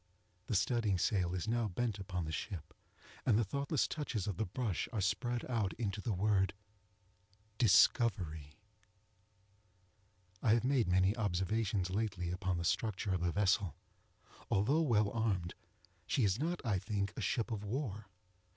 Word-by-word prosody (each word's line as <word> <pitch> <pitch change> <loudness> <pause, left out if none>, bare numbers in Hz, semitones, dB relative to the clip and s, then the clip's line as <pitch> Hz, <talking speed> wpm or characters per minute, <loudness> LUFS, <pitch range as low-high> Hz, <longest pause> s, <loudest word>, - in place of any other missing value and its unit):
The 110 - -1
studding 105 -1 +2
sail 90 -1 +1
is 90 - -3
now 115 0 +1
bent 105 +2 -2
upon 90 -3 -3
the 80 - -4
ship, 85 +1 -5 0.5
and 115 -5 +4
the 115 - +3
thoughtless 140 - 0
touches 120 - -3
of 100 -5 -3
the 110 - -1
brush 105 0 -2
are 110 - -2
spread 120 +5 0
out 115 -6 0
into 105 -3 -3
the 115 - -2
word 95 -1 +2 1.0
DISCOVERY. 95 - +3 1.9
I 110 - +4
have 120 - 0
made 130 -4 +2
many 95 +3 +3
observations 100 -1 0
lately 95 -4 -1
upon 90 0 -1
the 85 - -3
structure 100 0 0
of 90 - -1
the 90 0 +1
vessel. 100 -3 +1 0.7
Although 125 +11 +3
well 110 -9 +2
armed, 100 -7 -1 0.5
she 135 - +1
is 100 +2 +2
not, 165 -1 -2
I 105 -5 +1
think, 100 0 -2
a - - -4
ship 115 +4 -1
of 105 -2 -3
war. 105 -2 -3
105 Hz, 150 wpm, -35 LUFS, 95-115 Hz, 1.9 s, and